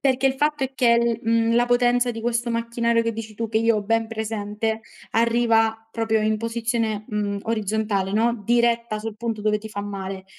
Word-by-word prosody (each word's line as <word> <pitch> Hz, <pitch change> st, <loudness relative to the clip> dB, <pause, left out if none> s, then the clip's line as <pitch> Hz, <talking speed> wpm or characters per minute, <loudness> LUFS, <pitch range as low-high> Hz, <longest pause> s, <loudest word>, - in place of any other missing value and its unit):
Perché, 265 Hz, -1 st, +2 dB
il 265 Hz, -, +3 dB
fatto 295 Hz, 0 st, 0 dB
è 265 Hz, -, -5 dB
che, 235 Hz, -2 st, +3 dB
mhmm, 230 Hz, 0 st, +2 dB
la 240 Hz, 0 st, +3 dB
potenza 245 Hz, 0 st, +3 dB
di 225 Hz, -1 st, -6 dB
questo 235 Hz, 0 st, 0 dB
macchinario 235 Hz, 0 st, +1 dB
che 230 Hz, 0 st, -1 dB
dici 220 Hz, -1 st, -7 dB
tu, 230 Hz, +2 st, -3 dB
che 220 Hz, -, +1 dB
io 230 Hz, 0 st, +3 dB
ho 210 Hz, -, -1 dB
ben 225 Hz, +2 st, +1 dB
presente, 220 Hz, 0 st, -3 dB, 0.3 s
arriva 225 Hz, -1 st, +2 dB
proprio 225 Hz, -1 st, 0 dB
in 215 Hz, 0 st, +1 dB
posizione, 230 Hz, -2 st, -1 dB
mhmm, 205 Hz, -1 st, -2 dB
orizzontale, 215 Hz, -3 st, -1 dB
no, 230 Hz, +2 st, +1 dB
diretta 235 Hz, -1 st, +2 dB
sul 220 Hz, 0 st, -5 dB
punto 225 Hz, -1 st, -3 dB
dove 210 Hz, 0 st, +2 dB
ti 220 Hz, +1 st, -9 dB
fa 205 Hz, -1 st, -5 dB
male. 195 Hz, -1 st, -6 dB
225 Hz, 190 wpm, -23 LUFS, 215-235 Hz, 0.3 s, il